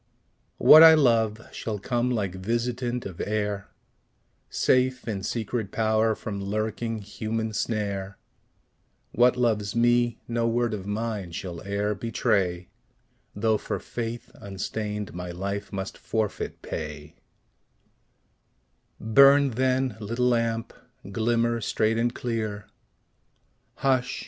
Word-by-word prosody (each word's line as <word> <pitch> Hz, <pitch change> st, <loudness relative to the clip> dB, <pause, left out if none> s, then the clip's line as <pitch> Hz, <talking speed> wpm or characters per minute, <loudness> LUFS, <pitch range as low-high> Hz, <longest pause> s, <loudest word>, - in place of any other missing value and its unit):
What 155 Hz, -, +9 dB
I 160 Hz, 0 st, +10 dB
love 115 Hz, -6 st, +2 dB
shall 110 Hz, -2 st, -4 dB
come 120 Hz, +4 st, -1 dB
like 105 Hz, -7 st, -1 dB
visitant 120 Hz, +5 st, -2 dB
of 95 Hz, -4 st, -6 dB
air, 105 Hz, -1 st, -2 dB, 0.8 s
Safe 130 Hz, 0 st, +1 dB
in 100 Hz, -4 st, -2 dB
secret 110 Hz, 0 st, -3 dB
power 110 Hz, 0 st, +2 dB
from 100 Hz, -2 st, -5 dB
lurking 110 Hz, +3 st, -2 dB
human 110 Hz, +2 st, -3 dB
snare; 100 Hz, -3 st, -2 dB, 0.9 s
What 125 Hz, +1 st, +4 dB
loves 110 Hz, -4 st, 0 dB
me, 120 Hz, 0 st, +2 dB
no 115 Hz, 0 st, 0 dB
word 120 Hz, 0 st, 0 dB
of 100 Hz, -2 st, -5 dB
mine 105 Hz, -4 st, -3 dB
shall 85 Hz, -1 st, -6 dB
e'er 100 Hz, +1 st, 0 dB
betray, 95 Hz, -4 st, -1 dB, 0.7 s
Though 110 Hz, 0 st, +1 dB
for -, -, -3 dB
faith 120 Hz, 0 st, -6 dB
unstained 105 Hz, +1 st, -5 dB
my 90 Hz, 0 st, -6 dB
life 100 Hz, +3 st, -4 dB
must 95 Hz, 0 st, -5 dB
forfeit 110 Hz, -4 st, -3 dB
pay 75 Hz, +1 st, -6 dB, 1.8 s
Burn, 140 Hz, +4 st, +6 dB
then, 130 Hz, -1 st, 0 dB
little 115 Hz, +4 st, 0 dB
lamp; 115 Hz, -1 st, 0 dB, 0.4 s
glimmer 115 Hz, +2 st, +1 dB
straight 110 Hz, +2 st, +1 dB
and 120 Hz, +1 st, +1 dB
clear 110 Hz, -4 st, -3 dB, 1.1 s
Hush! 130 Hz, -2 st, 0 dB
110 Hz, 110 wpm, -26 LUFS, 100-120 Hz, 1.8 s, I